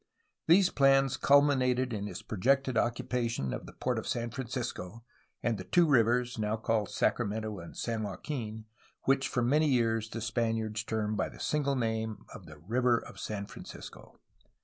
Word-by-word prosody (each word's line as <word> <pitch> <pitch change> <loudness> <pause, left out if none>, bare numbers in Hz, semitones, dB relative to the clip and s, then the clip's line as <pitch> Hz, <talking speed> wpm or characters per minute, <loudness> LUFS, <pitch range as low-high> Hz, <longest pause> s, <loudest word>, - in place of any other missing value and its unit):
These 180 +3 +6
plans 135 -1 +4
culminated 130 -3 +3
in 105 -1 -3
his 90 -3 -7
projected 130 +5 +1
occupation 115 - -1
of - - -6
the - - -11
port - - -1
of - - -7
San 120 -1 -2
Francisco 115 -4 -5 0.4
and 115 -4 0
the - - -5
two 170 - +4
rivers 125 -3 +2
(now 105 +1 0
called 110 -2 0
Sacramento 105 -1 -1
and 85 - -10
San 115 -2 -2
Joaquin) 110 - -5 0.4
which 135 0 +2
for 125 - 0
many 150 +6 +3
years 115 -4 +1
the 115 - -5
Spaniards 115 -1 -1
termed 110 -1 -2
by - - 0
the - - -14
single 140 -2 0
name 110 -3 -2
of - - -11
the 75 - -12
River 120 +9 +2
of - - -9
San 100 -2 -4
Francisco. - - -11
115 Hz, 165 wpm, -31 LUFS, 110-130 Hz, 0.4 s, These